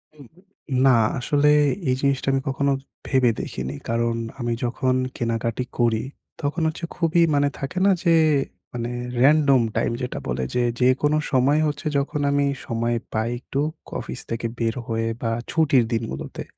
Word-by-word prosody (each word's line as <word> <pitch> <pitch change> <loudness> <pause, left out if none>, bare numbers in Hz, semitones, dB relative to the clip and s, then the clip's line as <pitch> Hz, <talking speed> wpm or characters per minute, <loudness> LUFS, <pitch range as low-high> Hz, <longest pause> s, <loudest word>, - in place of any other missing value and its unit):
হুম। 140 -4 -14 0.6
না, 130 -2 +6 0.2
আসলে 145 +3 +2 0.4
এই 130 - +3
জিনিসটা 140 -1 0
আমি 135 - +1
কখনো 140 +1 +1 0.4
ভেবে 130 -3 +3
দেখিনি। 65 +2 -5
কারণ 115 0 +1 0.2
আমি 120 -1 -1
যখন 130 +1 0 0.2
কেনাকাটা 115 +1 -1 0.2
করি 115 -2 +2 0.4
তখন 150 +4 -1
হচ্ছে 160 +2 -3
খুবই 170 0 +2
মানে 145 0 +3
থাকে 140 +6 -5
না 200 - +6
যে 170 -2 +4 0.6
মানে 120 0 -3 0.3
রেনডম 140 -2 +5
টাইম। - - +1
যেটা 125 - -3
বলে 65 +1 -1
যে 125 - +2 0.2
যেকোনো 135 +4 +3
সময় 135 +3 +3
হচ্ছে 145 0 -4
যখন 140 +1 -1
আমি 145 0 +2 0.2
সময় 115 -2 -1 0.2
পাই 110 +1 0
একটু 135 +2 -4 0.3
অফিস - - -5
থেকে 115 0 -3
বের 115 -1 0
হয়ে 115 0 -1
বা 115 -1 0 0.2
ছুটির 140 -6 +4
দিনগুলোতে। 115 0 -4
130 Hz, 150 wpm, -23 LUFS, 115-145 Hz, 0.6 s, না